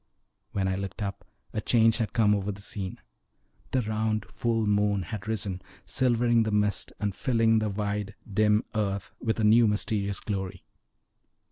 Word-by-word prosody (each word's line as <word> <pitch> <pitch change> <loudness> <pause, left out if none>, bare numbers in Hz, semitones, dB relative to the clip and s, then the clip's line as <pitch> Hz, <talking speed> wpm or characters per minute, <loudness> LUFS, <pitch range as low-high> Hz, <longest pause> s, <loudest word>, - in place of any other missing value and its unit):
When 95 -1 0
I 95 - 0
looked 100 +2 -4
up 100 -1 -4 0.3
a 110 - -1
change 115 0 +4
had 110 -5 -1
come 105 -2 +4
over 100 0 -1
the 100 - -9
scene: 100 -2 -4 0.7
the 130 -2 +1
round, 110 0 -1
full 115 -2 -1
moon 105 -1 +2
had 100 +1 -6
risen, 100 -4 -1 0.2
silvering 120 -2 +3
the 110 - +1
mist, 105 -1 +1
and 105 -2 -1
filling 115 0 +2
the 110 -1 0
wide, 105 0 -3
dim 105 +1 +3
earth 100 -3 -2
with 115 -1 -1
a - - +1
new 110 +2 +6
mysterious 105 -1 0
glory. 95 -3 -4
105 Hz, 160 wpm, -28 LUFS, 100-110 Hz, 0.7 s, new